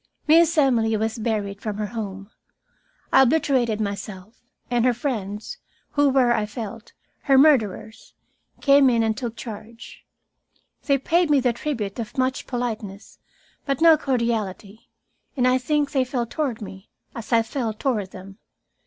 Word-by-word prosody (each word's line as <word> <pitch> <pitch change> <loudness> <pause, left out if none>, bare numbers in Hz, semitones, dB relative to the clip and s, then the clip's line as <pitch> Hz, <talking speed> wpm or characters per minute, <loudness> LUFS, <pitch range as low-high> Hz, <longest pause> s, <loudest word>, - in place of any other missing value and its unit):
Miss 330 +2 +4
Emily 230 -6 +3
was 220 +2 -2
buried 205 -3 -2
from 210 -2 -4
her 210 - -2
home. 200 -1 -6 0.8
I 265 - +7
obliterated 255 -5 +2
myself, 200 0 -6 0.3
and 240 -1 +2
her 250 -1 +3
friends, 225 - -4 0.3
who 290 -1 +3
were, 255 -3 +3
I 210 -2 -1
felt, 225 +1 -8 0.3
her 275 -2 +5
murderers, 230 -7 +2 0.5
came 275 -1 +5
in 230 -2 +2
and 220 -1 0
took 240 -2 -5
charge. 225 +1 -10 0.8
They 280 -2 +3
paid 335 +5 +1
me 290 -2 +4
the 250 -2 +1
tribute 230 -6 -4
of 230 +5 -6
much 260 +1 -1
politeness, 220 -5 -5 0.5
but 275 -2 0
no 330 -1 +7
cordiality, 230 -7 -3 0.5
and 250 -1 +3
I 255 +1 +3
think 290 +2 0
they 265 -2 +2
felt 245 -2 -3
toward 265 -9 -2
me 190 0 -11 0.2
as 225 -1 -9
I 230 -1 +4
felt 225 -2 -4
toward 215 -8 -1
them. 195 +2 -12
235 Hz, 150 wpm, -23 LUFS, 215-270 Hz, 0.8 s, I